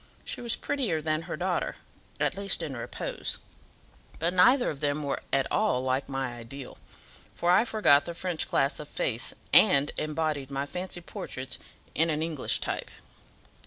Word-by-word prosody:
She - - -4
was 235 -1 +3
prettier 235 - -1
than 155 0 0
her - - -3
daughter, 180 0 -1 0.4
at - - +1
least 195 -3 0
in 145 -5 -4
repose; 120 - -3 0.8
but 170 +2 +1
neither 245 +8 +5
of 145 - -8
them 145 0 0
were 140 - -2
at 135 -1 +3
all 125 0 +2
like 130 +2 0
my 135 -2 -2
ideal; 125 +3 -9 0.6
for 175 - +2
I 200 +6 +5
forgot 150 -11 +4
the 170 - -5
French 175 -2 -2
class 135 +1 +1
of 150 - -7
face, 120 -4 -1 0.2
and 145 -8 +7
embodied 155 -3 -1
my 140 0 -2
fancy 180 +3 -5
portraits 130 -6 -5 0.3
in 165 +2 +3
an 155 0 0
English 160 -5 0
type." - - -3
155 Hz, 160 wpm, -28 LUFS, 135-175 Hz, 0.8 s, and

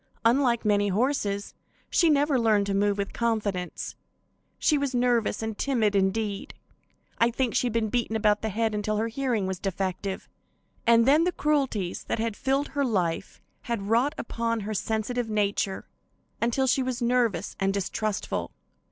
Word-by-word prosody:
Unlike 235 -1 +3
many 205 -1 +3
horses, 205 -2 0 0.4
she 335 - +4
never 290 -2 +3
learned 215 -3 +3
to 200 - -1
move 200 +1 +2
with 200 -1 -3
confidence. 210 -6 -2 0.6
She 305 - +3
was 280 -3 -1
nervous 240 -3 +1
and 220 -1 -3
timid; 220 -5 +1
indeed, 200 +1 -1 0.6
I 230 - +5
think 240 0 -1
she 250 - +2
had 235 - -3
been 225 -2 +1
beaten 235 -1 -1
about 210 -1 +2
the 220 - -1
head 220 +2 0
until 210 0 -1
her 225 +2 0
hearing 240 -4 -1
was 190 -1 -3
defective, 190 0 -3 0.6
and 230 +1 +5
then 300 +4 +5
the 360 - +2
cruelties 270 - -1
that - - -1
had 225 -1 -2
filled 270 +3 0
her 285 -1 -1
life 185 -10 -1 0.2
had 215 -4 -3
wrought 250 +7 +2
upon 230 -3 -2
her 210 +2 -4
sensitive 225 +3 -2
nature 200 -2 -1 0.5
until 240 +3 +1
she 265 +1 +2
was 255 -1 -2
nervous 235 -4 +1
and 195 0 +2
distrustful. 200 +1 -2
225 Hz, 160 wpm, -27 LUFS, 205-250 Hz, 0.6 s, I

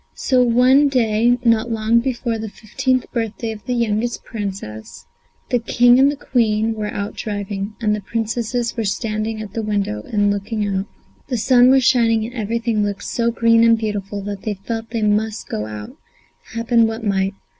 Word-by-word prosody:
So 255 -2 +2
one 250 +4 +5
day, 240 -1 +2
not 230 0 +3
long 225 +1 +2
before 235 -2 -2
the 220 0 -5
fifteenth 255 +5 -1
birthday 230 -1 -3
of 210 -2 -9
the 250 - 0
youngest 235 0 -1
Princess, 195 - -7 0.5
the 245 - +3
King 245 +2 +4
and 275 +1 +6
the - - -5
Queen 225 -5 +1
were 210 -1 -4
out 200 0 -4
driving, 205 0 -4
and 215 -2 +1
the 210 - -5
Princesses 230 +3 -2
were 230 - -1
standing 215 +1 -2
at 200 - -10
the 225 - -2
window 200 - -2
and 205 -1 +2
looking 205 +1 -2
out. 195 0 -2 0.4
The 255 -3 -1
sun 245 +2 +5
was 265 0 +5
shining, 230 -3 +3
and 240 - -8
everything 230 -1 -1
looked 200 -1 -3
so 235 -1 0
green 230 0 +3
and 230 0 +5
beautiful 205 -2 -4
that 200 -1 -5
they 215 -2 -3
felt 225 +4 -5
that - - -19
they 225 -2 -1
must 210 +1 0
go 105 0 -3
out, 105 -1 -8 0.6
happen 230 0 +3
what 225 +1 -5
might. 195 -2 0
225 Hz, 185 wpm, -20 LUFS, 205-235 Hz, 0.6 s, and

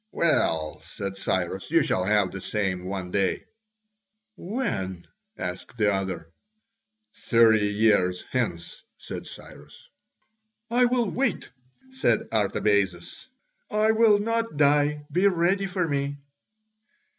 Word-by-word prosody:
"Well," 80 - +1
said 100 -1 -6
Cyrus, 95 -1 -2
"you 165 -1 +4
shall 95 -7 0
have 105 -2 +2
the 95 - -7
same 95 -4 -2
one 95 -1 -5
day." 100 -1 0 0.9
"When?" 135 - -4 0.3
asked 90 +6 -6
the 105 -2 +2
other. 90 -4 -4 0.8
"Thirty 110 -3 +3
years 100 -4 +2
hence," 115 -10 -3 0.2
said - - -8
Cyrus. - - -13 0.8
"I 245 +1 +4
will 240 -2 +1
wait," 255 -8 -1 0.4
said 265 0 +1
Artabazus: 100 - 0 0.4
"I 215 +1 +2
will 220 -2 +5
not 230 -3 -2
die: 145 0 +2
be 185 +3 +3
ready 190 +2 +1
for 180 -2 -1
me." 140 -1 -2
110 Hz, 110 wpm, -25 LUFS, -, 0.9 s, will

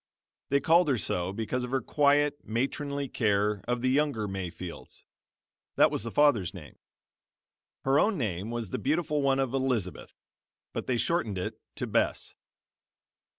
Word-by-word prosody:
They 140 - +3
called 165 +5 +4
her 130 - +2
so 90 -2 -2
because 115 +4 -2
of 125 - -4
her 135 +1 +1
quiet, 145 +1 +2
matronly 140 +4 -2
care 105 -4 +1
of 120 0 -1
the 130 - +3
younger 140 -7 +1
Mayfields 90 -3 -7 0.7
that - - +5
was - - -2
the 115 - -3
father's 115 -9 +3
name. 80 -5 -11 1.0
Her 135 +2 +3
own 215 -1 +2
name 100 - -2
was 115 -5 -4
the - - -2
beautiful 150 +1 0
one 135 -1 +3
of 135 -2 0
Elizabeth, 125 -9 -2 0.6
but - - -4
they 125 - +1
shortened 115 - 0
it 90 - -4
to - - -2
Bess. - - 0
125 Hz, 150 wpm, -29 LUFS, 105-140 Hz, 1.0 s, that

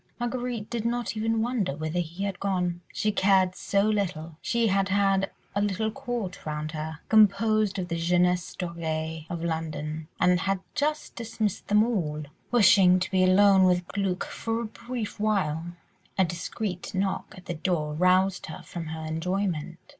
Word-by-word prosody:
Marguerite 240 -2 -3
did 235 -2 -3
not 240 0 -1
even 220 +1 +1
wonder 225 - -1
whither 155 +3 -2
he 170 +3 -4
had 200 -2 -3
gone—she 180 +1 -1
cared 190 -2 +3
so 200 0 +1
little; 185 -7 -1
she 235 -1 +1
had 195 -2 +2
had 195 0 +2 0.2
a 200 - 0
little 205 +2 0
court 240 -7 -4
round 155 0 -3
her, 160 +1 -5
composed 215 -1 +4
of 180 -2 -2
the 170 - -2
jeunesse 180 +1 +1
dorée 160 -2 -4
of 170 -1 -4
London, 155 -1 -3
and 180 0 +4
had 195 0 0
just 300 +1 -1
dismissed 220 -3 -3
them 210 +1 +5
all, 165 -10 -1 0.3
wishing 190 -5 +6
to 190 - -3
be 185 -1 +3
alone 195 +1 +6
with 180 -1 +3
Glück 195 -2 -1
for 225 0 -3
a - - -3
brief 235 0 -6
while. 185 -7 0 0.5
A 190 - +5
discreet 180 +3 -4
knock 190 0 -2
at 180 - -13
the 175 - -3
door 155 -2 -1
roused 185 +3 +2
her 160 - -8
from 170 -2 -6
her 160 0 -5
enjoyment. 170 0 -2
190 Hz, 160 wpm, -27 LUFS, 170-210 Hz, 0.5 s, wishing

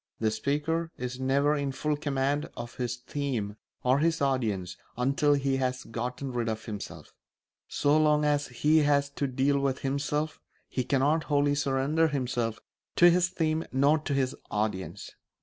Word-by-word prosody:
The 110 -1 +1
speaker 150 +8 -1
is 125 +1 -5
never 140 +3 +2
in 140 -2 -1
full 150 +3 -1
command 145 0 -1
of 120 0 -7
his 120 -2 -2
theme 125 -6 -3 0.3
or 130 +2 +3
his 165 +1 +2
audience 110 -10 0 0.2
until 140 +4 +2
he 135 -1 0
has 130 -1 -1
gotten 125 +4 -4
rid 120 -2 -1
of 110 0 -4
himself; 105 -3 -7 0.5
so 145 +1 +2
long 150 -1 +3
as 145 -1 +1
he 150 +6 +3
has 140 -1 +2
to 140 0 -2
deal 135 +2 +1
with 135 -1 -1
himself 150 +3 -1 0.3
he 125 - -2
cannot 145 +5 +2
wholly 145 -1 +2
surrender 145 +3 +1
himself 125 -6 -1 0.4
to 175 0 +7
his 175 +1 +3
theme 160 -2 0
nor 140 +4 +3
to 145 -2 -2
his 130 -1 0
audience. 105 -3 -3
140 Hz, 160 wpm, -28 LUFS, 125-150 Hz, 0.5 s, to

